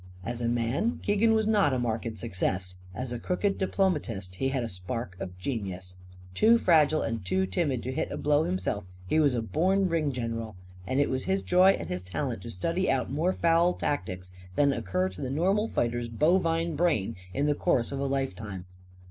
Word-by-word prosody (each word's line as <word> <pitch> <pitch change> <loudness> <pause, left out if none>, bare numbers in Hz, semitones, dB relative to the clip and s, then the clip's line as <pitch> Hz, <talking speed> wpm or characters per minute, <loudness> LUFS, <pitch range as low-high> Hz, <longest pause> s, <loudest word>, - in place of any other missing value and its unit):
As 120 +1 -4
a 120 - 0
man, 120 - 0
Keegan 210 +2 +3
was 220 -1 +2
not 205 -9 +3
a - - +1
marked 115 -2 -2
success. 95 -3 -2 0.2
As 125 +3 -3
a 120 - -4
crooked 195 - -1
diplomatist, 150 - -1
he 135 +9 -1
had 130 -3 -1
sparks 90 +2 -5
of 90 -1 -6
genius. 95 -4 -5 0.4
Too 225 - +5
fragile 155 -6 +4
and 115 -3 -3
too 95 0 +1
timid 130 - -1
to 130 - -3
hit 140 - -2
a - - -3
blow 150 +1 +2
himself, 95 - -2 0.2
he 155 +12 +2
was 145 -5 +3
a 115 - -1
born 185 - +2
ring 160 -4 +1
general. 115 -4 -4 0.3
And 130 - 0
it 145 - +2
was 130 0 -1
his 190 +1 0
joy 185 +2 +5
and - - -5
his 90 0 -3
talent 90 -3 -3
to - - -8
study 170 - -1
out 135 -1 0
more 160 +6 +1
foul 170 0 +3
tactics 90 -8 -3 0.2
than 140 -1 +4
occur 95 -5 -1
to 95 - -10
the 130 - -2
normal 190 +10 +1
fighter's 120 - -1
bovine 165 +5 +1
brain 145 - +1 0.2
in 140 +8 0
the 150 - +3
course 120 -4 +1
of 140 - -3
a 140 - 0
life 135 -4 -1
time. 95 -3 -7
130 Hz, 200 wpm, -28 LUFS, 105-165 Hz, 0.4 s, Too